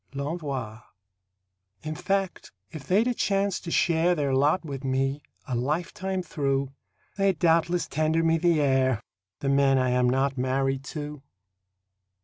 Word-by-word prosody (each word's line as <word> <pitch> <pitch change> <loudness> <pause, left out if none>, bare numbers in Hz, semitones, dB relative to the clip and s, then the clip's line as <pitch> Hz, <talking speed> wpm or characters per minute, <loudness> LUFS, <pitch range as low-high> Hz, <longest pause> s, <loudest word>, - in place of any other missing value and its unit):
L'ENVOI 140 -7 -4 1.0
In 155 0 -3
fact, 195 +3 -2 0.2
if 150 -5 -9
they'd 205 +5 +3
a 250 - +1
chance 200 -3 0
to 170 - -8
share 170 +1 +2
Their 140 -4 0
lot 145 +6 +2
with 140 -2 -6
me, 135 +2 0 0.3
a 130 - -4
lifetime 175 +8 -2
through, 140 -4 -1 0.5
They'd 195 -3 +2
doubtless 170 +1 +2
tender 155 +2 +1
me 165 0 +2
the 170 -2 +3
air 130 -4 +2 0.4
The 135 - 0
men 140 -1 +4
I 130 -1 +2
am 125 0 +3
not 135 +1 0
married 135 +1 0
to. 150 0 -6
145 Hz, 140 wpm, -26 LUFS, 135-170 Hz, 1.0 s, men